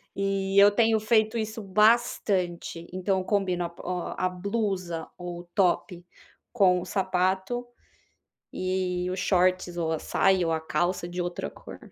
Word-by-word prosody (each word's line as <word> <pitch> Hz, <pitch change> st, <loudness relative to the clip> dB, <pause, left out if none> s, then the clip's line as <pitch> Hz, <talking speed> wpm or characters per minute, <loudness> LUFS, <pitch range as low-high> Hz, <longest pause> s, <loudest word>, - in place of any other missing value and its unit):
E 195 Hz, 0 st, +1 dB
eu 200 Hz, +1 st, +9 dB
tenho 220 Hz, +1 st, +3 dB
feito 220 Hz, +1 st, +2 dB
isso 220 Hz, 0 st, -3 dB
bastante. 195 Hz, -5 st, +1 dB
Então 190 Hz, +1 st, 0 dB
eu -, -, -3 dB
combino 190 Hz, -4 st, 0 dB
a -, -, -4 dB
bo 170 Hz, -, -14 dB
ó, 180 Hz, -1 st, -4 dB
a 185 Hz, -, +1 dB
blusa 185 Hz, -3 st, -3 dB
o 175 Hz, -1 st, -7 dB
top 180 Hz, -2 st, +1 dB, 0.5 s
com 190 Hz, -6 st, +4 dB
o -, -, -7 dB
sapato 190 Hz, +5 st, -1 dB, 0.9 s
e 185 Hz, 0 st, -2 dB, 0.3 s
e 180 Hz, -, -2 dB
o 185 Hz, -, -3 dB
shorts 185 Hz, -1 st, +1 dB
ou 165 Hz, -2 st, -1 dB
a 160 Hz, -, -1 dB
saia 190 Hz, 0 st, +2 dB
ou 165 Hz, -, 0 dB
a 160 Hz, -, 0 dB
calça 175 Hz, +2 st, -1 dB
de 175 Hz, +1 st, -5 dB
outra 175 Hz, 0 st, -4 dB
cor. -, -, -12 dB
185 Hz, 160 wpm, -27 LUFS, 175-200 Hz, 0.9 s, eu